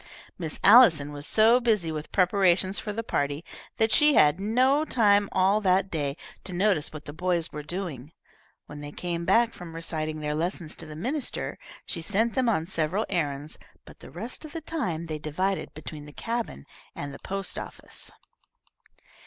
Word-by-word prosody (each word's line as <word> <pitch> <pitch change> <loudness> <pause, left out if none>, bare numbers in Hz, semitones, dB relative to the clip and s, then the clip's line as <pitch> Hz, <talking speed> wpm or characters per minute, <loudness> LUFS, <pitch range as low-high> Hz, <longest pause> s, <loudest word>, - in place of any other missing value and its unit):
Miss 160 -4 -5
Allison 190 - +7
was 145 +1 -4
so 225 +3 +5
busy 215 -9 +1
with 155 -1 -6
preparations 185 0 +3
for 210 - -4
the 225 +2 -4
party 145 -4 -2 0.3
that 220 0 +2
she 300 -2 +5
had 150 -1 +5
no 255 +8 +3
time 205 -8 +3
all 195 +3 +3
that 190 0 +2
day 145 -2 -2 0.3
to - - -8
notice 180 -4 +1
what 155 -1 -9
the 145 - -7
boys 175 0 0
were 150 - -5
doing. 150 -4 -5 0.5
When 150 0 -9
they 145 0 -7
came 170 +1 -4
back 230 +3 +3
from 170 -2 -10
reciting 155 -2 -3
their 150 0 -2
lessons 165 0 -3
to 160 - -7
the 155 - -8
minister, 255 - -2 0.3
she 170 - -3
sent 215 +7 +1
them 255 -3 +2
on 165 -8 +1
several 175 +4 0
errands, 150 -4 -2 0.3
but - - -15
the - - -12
rest 225 - -6
of 310 - -9
the 330 - -5
time 185 - -3
they 155 -2 -5
divided 185 +6 -2
between 155 -1 -8
the 150 - -12
cabin 230 - -4 0.3
and 140 -1 -6
the - - -10
post 195 -1 -4
office. - - -9
180 Hz, 180 wpm, -27 LUFS, 155-215 Hz, 0.5 s, Allison